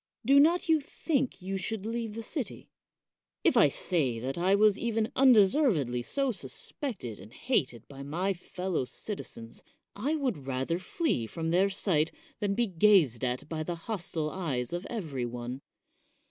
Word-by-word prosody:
Do 275 +3 +6
not 335 +5 +4
you 320 -1 +4
think 275 - -2
you 195 +1 -3
should 205 +2 -2
leave 230 -1 -3
the 230 - -5
city? 265 +1 -5 0.7
If - - +4
I - - +7
say 145 -10 +1
that 130 +3 -3
I 185 +3 +3
was 210 0 +4
even 225 -2 -1
undeservedly 210 - +4
so 270 - 0
suspected 200 - -4
and 100 +4 -12
hated 130 - -1
by 140 -1 -10
my 175 +8 -1
fellow 180 -2 -3
citizens, 115 - -6 0.3
I 275 +10 -1
would 245 - -2
rather 135 +6 -1
flee 185 - -1
from 165 +5 -3
their 190 +3 +3
sight 180 -5 +1 0.3
than 200 -2 0
be 240 - +2
gazed 175 - +4
at 125 +3 -2
by 155 0 -4
the 170 +2 -3
hostile 165 -4 -3
eyes 145 -8 -3
of 175 +2 -4
every 150 - -3
one. 120 +2 -6
185 Hz, 160 wpm, -29 LUFS, 140-225 Hz, 0.7 s, I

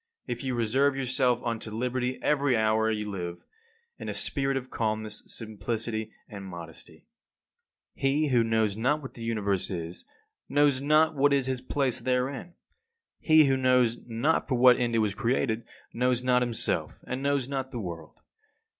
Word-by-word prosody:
If 120 0 -4
you 130 -2 -1
reserve 130 +5 +2
yourself 125 -2 +1
unto 115 -2 -3
liberty 125 +3 -2
every 140 -4 +2
hour 110 0 +2
you 105 -1 -2
live, 90 -4 -5 0.5
in - - -5
a - - -3
spirit 135 -1 0
of 130 -1 -6
calmness, 110 -1 -2
simplicity, 110 0 -4 0.2
and 100 -2 -8
modesty. 85 -4 -10 0.9
52. 135 - +1
He 150 +3 +2
who 120 -3 +4
knows 110 -2 +1
not 140 +7 0
what 130 - -8
the 115 - -11
Universe 105 -5 -1
is 85 -1 -5 0.5
knows 145 -2 +3
not 155 +3 +4
what 140 +1 +3
is 135 -2 +2
his 130 -1 -1
place 130 -1 -1
therein. 130 +6 -2 0.6
He 155 -1 +6
who 135 -1 +3
knows 125 -2 +3
not 120 +8 +1
for 130 - 0
what 125 0 +6
end 120 -1 0
it 110 -1 +3
was 100 - -2
created, 120 -1 0 0.3
knows 125 0 +1
not 125 -1 +3
himself 120 -2 -1
and 130 +1 -4
knows 140 -2 0
not 135 -1 -3
the 120 - -5
world. 85 -6 -8
125 Hz, 165 wpm, -28 LUFS, 110-135 Hz, 0.9 s, He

